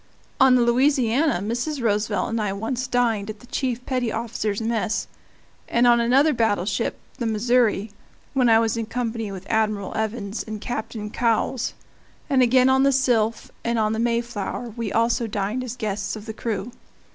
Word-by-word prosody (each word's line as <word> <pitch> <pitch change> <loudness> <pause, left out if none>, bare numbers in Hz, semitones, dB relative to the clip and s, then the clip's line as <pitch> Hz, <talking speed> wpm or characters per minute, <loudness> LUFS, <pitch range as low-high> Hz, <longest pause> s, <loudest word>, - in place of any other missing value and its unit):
On 265 -2 +6
the 245 - +4
Louisiana 255 - +2
Mrs. 245 +7 -2
Roosevelt 210 -2 0
and 230 -1 0
I 200 -2 -1
once 235 +5 -3
dined 230 -5 +1
at 215 -1 -6
the 245 - -15
chief 250 -1 -2
petty 250 -3 -1
officers' 220 -3 -2
mess, 225 -1 -1 0.6
and 240 +1 +3
on 240 -1 +6
another 270 +6 +4
battleship, 220 -2 0 0.2
the 235 - -1
Missouri 225 -1 +2 0.4
(when 255 -3 +3
I 225 - +7
was 225 0 +1
in 225 -1 -3
company 230 -3 -3
with 190 -1 -8
Admiral 215 -3 0
Evans 220 -1 -2
and 215 -1 -6
Captain 220 -2 -5
Cowles), 235 +2 0 0.6
and 265 -2 +4
again 255 +1 +5
on 265 0 +4
the 275 0 +4
Sylph 235 -4 +1
and 235 0 0
on 215 -1 +1
the 220 - -2
Mayflower, 235 -1 -2
we 230 -4 -3
also 230 +1 +1
dined 210 +4 -2
as 250 -1 -5
guests 210 -3 -3
of 215 -1 -9
the 220 - -5
crew. 220 0 -3
230 Hz, 170 wpm, -23 LUFS, 215-245 Hz, 0.6 s, I